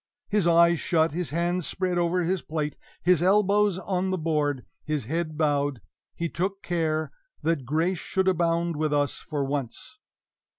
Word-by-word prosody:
His 205 -4 +2
eyes 170 -1 +5
shut, 165 -2 +2
his 175 +2 -3
hands 170 0 0
spread 180 -1 -1
over 175 +1 +1
his 180 +2 0
plate, 150 -1 -3 0.3
his 180 -3 +4
elbows 200 +1 +3
on 190 0 -1
the 185 - 0
board, 150 -5 0 0.2
his 150 -6 -2
head 155 +3 -2
bowed, 145 -4 +1 0.4
he 170 - -2
took 190 +4 -3
care 160 -2 -1 0.3
that 160 -5 0
grace 160 +6 0
should 190 +1 -1
abound 170 -2 +1
with 155 -1 0
us 145 -1 +1
for 145 -3 -3
once! 140 - -5
170 Hz, 160 wpm, -26 LUFS, 150-180 Hz, 0.4 s, eyes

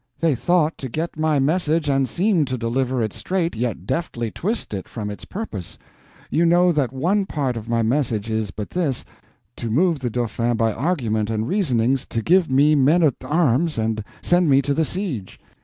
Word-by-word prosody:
They 165 -3 +2
thought 160 +5 +1
to 130 - -5
get 160 +4 -4
my 155 -1 +2
message 155 +2 +1
and 135 -2 +1
seem 180 - +2
to 130 -1 -3
deliver 125 +1 0
it 110 - -3
straight, 180 -2 -2
yet 110 -6 -3
deftly 120 -6 -2
twist 215 - -3
it 95 -2 -5
from 105 -3 -5
its 100 - -9
purpose. 145 - -6 0.5
You 165 - +2
know 175 +1 +4
that 145 -7 0
one 185 +9 0
part 135 -7 -1
of 115 0 -7
my 115 -1 +1
message 115 -3 0
is 110 -2 -1
but 100 +2 -7
this—to 130 - -5
move 160 +6 +2
the 125 -2 -2
Dauphin 120 0 -1
by 110 -1 +1
argument 115 - -1
and 110 0 -1
reasonings 130 - +1
to 115 - -3
give 180 - +3
me 140 +3 +4
men 150 +5 +4
at 145 -5 +4
arms 150 +1 +1
and 110 -1 -1 0.2
send 175 -2 +3
me 135 0 +5
to 140 - 0
the 160 +3 +1
siege. 150 - -4
135 Hz, 190 wpm, -22 LUFS, 115-165 Hz, 0.5 s, me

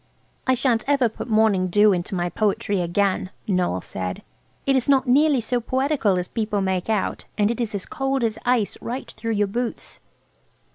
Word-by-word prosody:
"I 260 - +4
shan't 235 -3 +1
ever 280 -4 +3
put 225 - -8
morning 215 -4 +3
dew 205 +3 +5
into 180 +2 -3
my 175 -1 0
poetry 200 0 0
again," 185 +2 0 0.2
Noël 180 - 0
said; 90 -1 -5 0.4
"it 275 - +3
is 260 +1 0
not 270 -1 +4
nearly 280 +2 +4
so 240 +1 -1
poetical 260 -5 +1
as 180 0 -2
people 215 -3 -2
make 190 0 -1
out, 215 -3 -1
and 210 +1 +3
it 235 - -3
is 220 -3 -2
as 195 - -4
cold 270 -4 -1
as 225 -1 -1
ice, 245 -4 +1
right 245 +3 -5
through 230 -1 -3
your 205 -1 +2
boots." 235 +4 -4
220 Hz, 185 wpm, -23 LUFS, 195-250 Hz, 0.4 s, dew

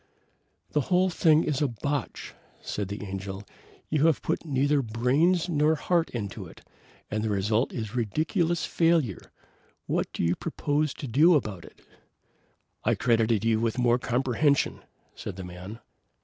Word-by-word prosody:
"The 150 - +2
whole 185 0 +3
thing 160 -1 +4
is 150 -1 -1
a 145 - +3
botch," 135 +3 -4 0.3
said 105 -2 -4
the 100 +2 -6
Angel. 95 0 -6 0.4
"You 155 +1 +2
have 160 - +1
put 160 - -1
neither 145 -1 +1
brains 135 +10 +2
nor 155 -1 +2
heart 170 +2 +1
into 105 -5 -5
it, - - -16 0.4
and 110 0 -1
the 110 - -1
result 105 +4 +1
is 110 -2 -5
ridiculous 160 - 0
failure. 165 - +1 0.5
What - - -1
do - - -3
you 85 +1 +2
propose 150 -2 -1
to 140 - -6
do 155 +9 +5
about 100 - -2
it?" - - -17 1.0
"I - - +2
credited 115 -2 +2
you 115 -1 +3
with 115 +1 -1
more 120 0 +3
comprehension," 135 +3 +1 0.3
said - - -7
the 95 - -7
man. 90 +4 -8
125 Hz, 150 wpm, -27 LUFS, 110-155 Hz, 1.0 s, do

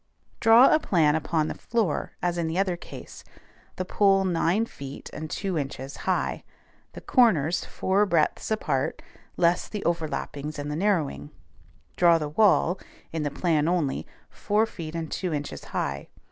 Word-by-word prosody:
Draw 230 +3 +7
a - - +5
plan 160 - +3
upon 155 0 0
the - - -3
floor 220 -10 -2
as 175 -1 0
in 165 - 0
the 160 +2 -2
other 190 -2 +1
case; 170 - -11 0.5
the 185 - -3
pole 195 0 +3
nine 180 +4 +1
feet 140 -10 -9
and 155 0 -6
two 190 -2 -2
inches 135 -1 -5
high, - - 0 0.5
the - - -9
corners 175 - +3
four 200 +2 +1
breadths 165 -4 +1
apart 220 0 -1 0.3
less 175 0 +2
the 210 - -5
overlappings 155 -3 -3
and 145 0 -4
the - - -2
narrowing; 155 - 0 0.7
draw 170 -2 +6
the 150 -2 -3
wall 185 +1 +3 0.3
(in 160 - -3
the 145 - -1
plan 155 0 +1
only) 170 -6 0 0.2
four 215 +2 +1
feet 165 -7 -8
and 165 -2 -4
two 180 -2 -2
inches 145 0 -6
high. 70 0 -3
170 Hz, 160 wpm, -26 LUFS, 150-195 Hz, 0.7 s, Draw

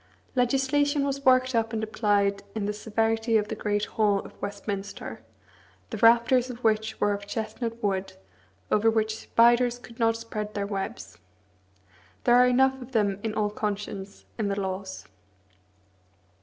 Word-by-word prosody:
Legislation 275 +3 +2
was 275 0 -3
worked 255 0 +4
up 225 -1 0
and 220 -1 -2
applied 205 -2 +1
in 215 -2 -2
the 210 - -1
severity 225 +1 +1
of 210 -1 -1
the 220 - -3
great 210 -1 -1
hall 210 -2 +1
of - - -12
Westminster, 200 - -5 0.7
the - - -3
rafters 235 +3 +4
of 250 0 -8
which 220 0 +1
were 205 - +2
of 200 0 -6
chestnut 230 +2 -4
wood, 195 -1 -1 0.6
over 220 +2 +4
which 220 -1 0
spiders 240 +1 +3
could 240 -1 -15
not 225 -1 +2
spread 215 -2 -6
their 200 -1 -1
webs. 195 - -5 1.0
There 240 - +4
are 250 0 +6
enough 265 +1 +3
of 250 +1 -11
them 205 -3 +1
in 220 -1 -3
all 210 -1 0
conscience 205 -2 -5
in 215 - 0
the 200 0 -1
laws. 190 0 -5
220 Hz, 155 wpm, -26 LUFS, 205-240 Hz, 1.0 s, are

